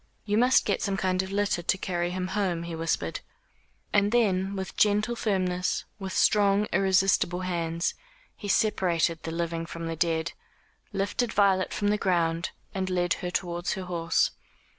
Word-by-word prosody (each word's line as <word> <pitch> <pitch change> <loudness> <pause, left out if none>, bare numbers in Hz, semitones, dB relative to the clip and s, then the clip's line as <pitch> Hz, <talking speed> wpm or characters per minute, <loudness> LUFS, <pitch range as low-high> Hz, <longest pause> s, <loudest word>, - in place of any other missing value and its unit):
"You 205 -1 0
must 250 +4 +4
get 200 - 0
some 195 -1 -1
kind 185 0 +1
of 190 0 -6
litter 200 -3 0
to 180 - +1
carry 175 -2 -2
him 185 0 -3
home," 185 -5 -1
he 170 0 -6
whispered. 165 0 -2 0.7
And 205 0 +3
then 200 -5 +2
with 190 -1 -5
gentle 210 +3 +2
firmness, 185 -5 0
with 190 -1 -5
strong 205 +1 +3
irresistible 190 -1 +2
hands, 170 -2 -1 0.4
he 205 - -8
separated 175 -5 +1
the 165 - -5
living 165 0 -2
from 165 0 -6
the 165 0 -3
dead, 165 0 0 0.6
lifted 205 +4 -1
Violet 195 -2 +3
from 205 - 0
the 210 0 +1
ground 170 -2 +1 0.2
and 190 -1 -2
led 175 -1 +1
her 180 - -2
towards 175 -1 -2
her 190 - -5
horse. 170 -2 +1
185 Hz, 160 wpm, -27 LUFS, 170-200 Hz, 0.7 s, must